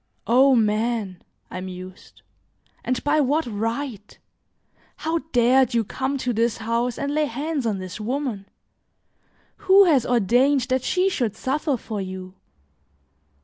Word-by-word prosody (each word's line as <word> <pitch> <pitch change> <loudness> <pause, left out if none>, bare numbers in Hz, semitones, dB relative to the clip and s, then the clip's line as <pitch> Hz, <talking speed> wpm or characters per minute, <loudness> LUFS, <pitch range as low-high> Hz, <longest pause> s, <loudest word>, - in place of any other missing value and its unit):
"O 260 +3 +5
man!" 215 -3 0 0.3
I 185 - -5
mused, 185 0 -10 0.6
"and 255 0 -2
by 295 +1 +2
what 295 +4 +1
right? 225 0 -4 0.8
How 325 +1 -1
dared 245 +1 +3
you 230 - +3
come 265 +6 -3
to 255 -2 -2
this 230 0 0
house 230 +2 -1
and 280 +1 -2
lay 305 0 +2
hands 285 0 -3
on 210 -3 -1
this 185 +1 -7
woman? 240 -4 -3 1.1
Who 390 +1 +6
has 300 -10 +4
ordained 245 +5 +3
that 260 0 +1
she 365 +8 +1
should 240 - -1
suffer 275 +3 -1
for 215 -2 -5
you? 185 -1 -7
245 Hz, 135 wpm, -23 LUFS, 215-280 Hz, 1.1 s, Who